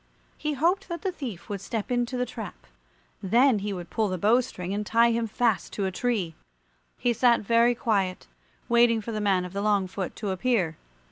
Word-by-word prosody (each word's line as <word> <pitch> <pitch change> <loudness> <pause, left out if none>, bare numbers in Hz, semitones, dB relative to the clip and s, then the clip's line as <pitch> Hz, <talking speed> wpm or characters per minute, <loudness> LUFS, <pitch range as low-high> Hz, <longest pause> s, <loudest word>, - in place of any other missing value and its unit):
He 300 -1 -2
hoped 340 +9 +1
that 340 0 -5
the 380 - 0
thief 250 - -7
would 200 -2 -4
step 225 +2 -4
into 245 +1 0
the 250 - 0
trap; 220 -4 -8 0.6
then 235 +4 +4
he 205 +1 -3
would 175 -3 -6
pull 220 -2 +1
the 185 - -2
bow 220 +8 +4
string 185 -6 -6
and 210 +1 -1
tie 230 +2 +4
him 230 0 0
fast 225 -1 0
to 200 - -1
a 190 - -1
tree. 205 -6 -1 0.6
He 245 -1 +1
sat 240 +1 +4
very 235 +3 +3
quiet, 195 -6 0 0.4
waiting 235 -1 +4
for 220 +2 -6
the 215 -1 -2
man 190 -3 +2
of 180 - -9
the 200 - -2
long 205 -2 +2
foot 185 0 -5
to 205 -3 -3
appear. 190 -5 0
220 Hz, 205 wpm, -26 LUFS, 195-245 Hz, 0.6 s, then